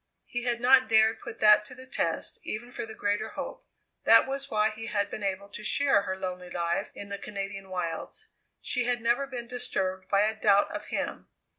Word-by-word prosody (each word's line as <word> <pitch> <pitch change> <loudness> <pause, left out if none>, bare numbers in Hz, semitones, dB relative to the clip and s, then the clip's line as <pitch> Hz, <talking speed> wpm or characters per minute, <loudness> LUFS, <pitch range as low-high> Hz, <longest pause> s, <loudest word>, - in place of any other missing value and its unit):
He 245 0 -4
had 240 -1 0
not 255 +1 +5
dared 220 0 +4
put 235 - -8
that 210 0 +7
to 250 - -11
the 260 +1 -11
test 260 - -2
even 240 +3 -5
for 230 - -5
the 220 - -9
greater 205 +2 -1
hope. - - -7 0.4
That - - +7
was 275 +1 -3
why 215 0 +2
he 225 +1 -7
had 205 -2 -1
been - - -5
able 200 0 -2
to 210 - -8
share 275 -1 +4
her 190 -1 -4
lonely 180 -1 -5
life 170 -1 -1
in 200 - -8
the 200 0 -5
Canadian 195 -1 -6
wilds 175 -3 -4 0.4
she 250 -2 0
had 245 0 +1
never 240 +4 +1
been 245 -3 -6
disturbed 190 -7 -2
by 200 0 +4
a 215 +1 +2
doubt 205 -2 +3
of - - -5
him. - - -4
215 Hz, 205 wpm, -28 LUFS, 195-245 Hz, 0.4 s, that